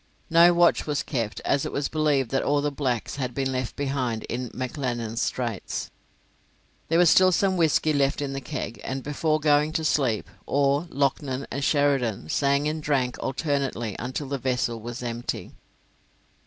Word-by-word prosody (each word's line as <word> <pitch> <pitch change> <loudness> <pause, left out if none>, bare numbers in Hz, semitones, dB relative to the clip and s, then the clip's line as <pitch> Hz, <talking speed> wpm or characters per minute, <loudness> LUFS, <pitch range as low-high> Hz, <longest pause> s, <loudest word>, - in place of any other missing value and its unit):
No 170 +1 +7
watch 175 -1 +3
was 150 -1 0
kept, 115 -7 -3
as 140 - +1
it - - -3
was 140 - -1
believed 150 -5 +1
that 135 - +1
all 145 0 +2
the 145 0 0
blacks 130 -3 -2
had 125 -3 -3
been 135 -1 0
left 130 -1 -3
behind 135 -5 -2
in 125 0 -4
McLennan's 120 -3 -3
Straits. 120 -6 -3 1.0
There 165 - +2
was 175 0 +6
still 185 0 +6
some 190 +2 +2
whisky 160 -2 +2
left 140 -1 +1
in 140 -1 -3
the 135 - -4
keg; 120 -2 -5
and, 130 0 -4
before 155 +1 0
going 150 0 +3
to 160 -1 -1
sleep, 130 -7 +1 0.2
Orr, 140 +3 +2
Loughnan, 140 -1 -1
and 140 - -3
Sheridan 135 - +1
sang 140 - +2
and 155 +1 -2
drank 135 -4 0
alternately 135 -6 -2
until 130 +4 -4
the 140 -1 -2
vessel 125 -3 -1
was 120 +2 -6
empty. 120 0 -4
140 Hz, 170 wpm, -25 LUFS, 125-150 Hz, 1.0 s, No